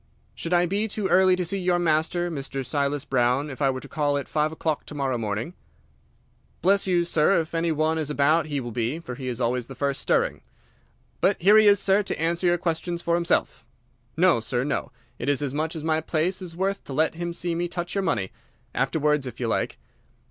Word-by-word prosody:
"Should 165 Hz, -, -6 dB
I 175 Hz, 0 st, +4 dB
be 200 Hz, +5 st, -1 dB
too 205 Hz, -2 st, -2 dB
early 185 Hz, +1 st, +5 dB
to 180 Hz, -1 st, -1 dB
see 195 Hz, +4 st, -1 dB
your 180 Hz, -1 st, +2 dB
master, 175 Hz, +1 st, +1 dB
Mr. 135 Hz, -3 st, -4 dB
Silas 140 Hz, +2 st, -1 dB
Brown, 130 Hz, +3 st, +1 dB
if 135 Hz, -, -9 dB
I 135 Hz, -, +4 dB
were 130 Hz, -1 st, -3 dB
to -, -, -10 dB
call 145 Hz, -2 st, 0 dB
at 140 Hz, -, -4 dB
five 155 Hz, 0 st, 0 dB
o'clock 160 Hz, -1 st, -2 dB
to 150 Hz, -, -8 dB
morrow 135 Hz, -3 st, -1 dB
morning?" 110 Hz, +6 st, -3 dB, 1.1 s
"Bless 195 Hz, +2 st, +3 dB
you, 175 Hz, -2 st, +2 dB
sir, 165 Hz, +3 st, +3 dB
if 160 Hz, 0 st, -4 dB
any 165 Hz, 0 st, +1 dB
one 160 Hz, +1 st, +1 dB
is 155 Hz, -2 st, -2 dB
about 150 Hz, +2 st, +2 dB
he 145 Hz, -2 st, -2 dB
will 120 Hz, -2 st, -5 dB
be, 120 Hz, +6 st, -1 dB
for 165 Hz, -6 st, -7 dB
he 130 Hz, 0 st, -7 dB
is 125 Hz, -1 st, -3 dB
always 125 Hz, 0 st, 0 dB
the 135 Hz, -, -9 dB
first 140 Hz, 0 st, -1 dB
stirring. -, -, +1 dB, 0.8 s
But 200 Hz, -, +2 dB
here 200 Hz, +5 st, +6 dB
he 215 Hz, -, +5 dB
is, 200 Hz, -1 st, +6 dB
sir, 195 Hz, +1 st, +3 dB
to 200 Hz, -, -4 dB
answer 170 Hz, +2 st, 0 dB
your 175 Hz, 0 st, +3 dB
questions 170 Hz, 0 st, -2 dB
for 170 Hz, -, 0 dB
himself. 170 Hz, +1 st, 0 dB, 0.5 s
No, 180 Hz, -6 st, +4 dB
sir, 120 Hz, +2 st, -1 dB
no; 140 Hz, +1 st, -2 dB, 0.3 s
it 125 Hz, -, -2 dB
is 145 Hz, 0 st, +1 dB
as 135 Hz, -2 st, -2 dB
much 155 Hz, +3 st, -2 dB
as 155 Hz, -, -5 dB
my 160 Hz, 0 st, +1 dB
place 170 Hz, +4 st, -1 dB
is 175 Hz, -3 st, -7 dB
worth 195 Hz, +2 st, -1 dB
to 140 Hz, -, -7 dB
let 155 Hz, +3 st, +2 dB
him 170 Hz, +1 st, -4 dB
see 170 Hz, 0 st, -2 dB
me 175 Hz, +1 st, -1 dB
touch 175 Hz, 0 st, -4 dB
your 200 Hz, -, 0 dB
money. 100 Hz, -, -1 dB, 0.4 s
Afterwards, 150 Hz, -3 st, +1 dB
if 120 Hz, -, -8 dB
you 125 Hz, -, -1 dB
like." 115 Hz, -, -1 dB
160 Hz, 225 wpm, -25 LUFS, 140-175 Hz, 1.1 s, here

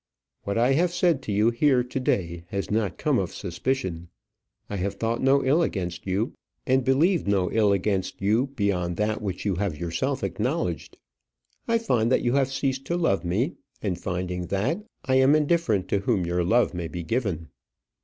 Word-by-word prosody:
What 100 Hz, +1 st, -1 dB
I 120 Hz, +3 st, +3 dB
have 170 Hz, +5 st, +2 dB
said 175 Hz, -5 st, +2 dB
to 110 Hz, -, -5 dB
you 105 Hz, +3 st, +3 dB
here 125 Hz, +1 st, +3 dB
to 125 Hz, +2 st, -4 dB
day 85 Hz, -9 st, -1 dB
has 100 Hz, +1 st, -4 dB
not 105 Hz, -3 st, 0 dB
come -, -, +1 dB
of -, -, -2 dB
suspicion. 90 Hz, -3 st, -3 dB, 0.6 s
I 100 Hz, -, -4 dB
have 95 Hz, +2 st, -2 dB
thought 115 Hz, +1 st, -1 dB
no 135 Hz, +1 st, +3 dB
ill 145 Hz, +6 st, +4 dB
against 90 Hz, -, -3 dB
you, 100 Hz, +6 st, 0 dB, 0.3 s
and 130 Hz, 0 st, +2 dB
believed 150 Hz, -, +2 dB
no 95 Hz, -3 st, +1 dB
ill 105 Hz, -2 st, +3 dB
against 95 Hz, -1 st, -1 dB
you 110 Hz, +7 st, +2 dB
beyond 100 Hz, -9 st, -1 dB
that 105 Hz, 0 st, 0 dB
which 95 Hz, -2 st, -4 dB
you 95 Hz, -4 st, 0 dB
have 95 Hz, -5 st, -1 dB
yourself 85 Hz, +1 st, -2 dB
acknowledged. 85 Hz, -3 st, -2 dB, 0.7 s
I 230 Hz, -, +3 dB
find 125 Hz, -, +1 dB
that -, -, +3 dB
you 120 Hz, -, +1 dB
have 135 Hz, -1 st, +2 dB
ceased 135 Hz, -1 st, -1 dB
to 170 Hz, +5 st, -1 dB
love 165 Hz, -, +1 dB
me, 105 Hz, -, -1 dB, 0.3 s
and 95 Hz, -4 st, 0 dB
finding 90 Hz, 0 st, -3 dB
that, 120 Hz, -, -1 dB, 0.2 s
I 130 Hz, -1 st, +3 dB
am 135 Hz, +3 st, +5 dB
indifferent 150 Hz, -, +1 dB
to 100 Hz, -, +2 dB
whom 100 Hz, -3 st, 0 dB
your 90 Hz, +1 st, 0 dB
love 115 Hz, +7 st, +3 dB
may 85 Hz, -2 st, -3 dB
be 85 Hz, +1 st, -6 dB
given." 90 Hz, -, -2 dB
105 Hz, 185 wpm, -25 LUFS, 90-130 Hz, 0.7 s, am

